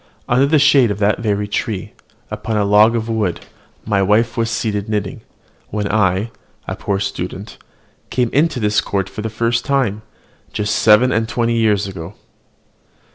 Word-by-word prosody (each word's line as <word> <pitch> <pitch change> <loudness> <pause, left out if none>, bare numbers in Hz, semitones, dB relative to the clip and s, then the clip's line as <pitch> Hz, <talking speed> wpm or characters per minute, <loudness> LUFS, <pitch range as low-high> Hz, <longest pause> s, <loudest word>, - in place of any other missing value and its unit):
Under 130 +3 +3
the 155 +2 +3
shade 140 -4 +5
of 105 - -2
that 105 0 +1
very 105 -2 -1
tree, 105 -2 -3 0.4
upon 110 -1 -3
a 105 - +1
log 105 +3 +5
of 115 -1 -2
wood, 110 -6 -1 0.4
my 100 -2 +1
wife 105 +4 +2
was 115 -1 0
seated 110 -3 -2
knitting, 105 -2 -3 0.5
when 105 -1 -2
I, 100 +1 +1 0.4
a - - -3
poor 100 -1 -2
student, 95 +1 -5 0.5
came 125 -2 0
into 150 -1 +2
this 105 -1 +1
court 95 -2 -2
for 100 +2 -7
the 110 - -3
first 115 +2 -1
time, 130 -7 0 0.5
just 105 0 -1
seven 110 +4 +5
and 115 0 0
twenty 115 0 0
years 105 -3 +2
ago." 95 0 -8
110 Hz, 165 wpm, -18 LUFS, 100-115 Hz, 0.5 s, shade